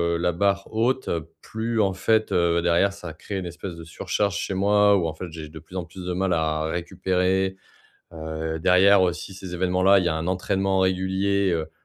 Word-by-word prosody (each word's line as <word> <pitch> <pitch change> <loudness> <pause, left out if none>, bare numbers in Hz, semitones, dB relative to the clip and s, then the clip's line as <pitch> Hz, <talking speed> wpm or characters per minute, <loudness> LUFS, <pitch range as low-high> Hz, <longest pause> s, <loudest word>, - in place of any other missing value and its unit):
heu, - - 0
la 90 +1 +1
barre 100 +3 0
haute, 125 +4 0
heu, 80 -1 -3
plus, 115 +1 -3
en 95 -2 +1
fait, 110 +3 +1
heu, 85 -1 +2
derrière, 85 +3 +3
ça 90 -5 -8
crée 95 +5 -6
une 95 - -4
espèce 85 +1 -7
de 85 - -10
surcharge 100 +4 -2
chez - - -3
moi 100 +1 +4
ou, 90 - 0
en 80 - -4
fait, 80 - -7
j'ai 80 -1 -8
de 80 +1 -10
plus 80 +4 -15
en 90 -2 -3
plus 90 +2 -10
de 90 - -2
mal 95 0 0
à 80 -1 0
récupérer, 95 +2 0 0.6
heu, 80 0 -4
derrière 95 +4 +5
aussi 90 +1 -2
ces 95 -1 -8
évènements-là, 95 +2 +3
il - - -1
y - - +2
a 80 - 0
un 80 +1 -3
entraînement 95 +1 0
régulier, 95 +1 +1
heu, 80 -2 -2
90 Hz, 215 wpm, -24 LUFS, 85-100 Hz, 0.6 s, derrière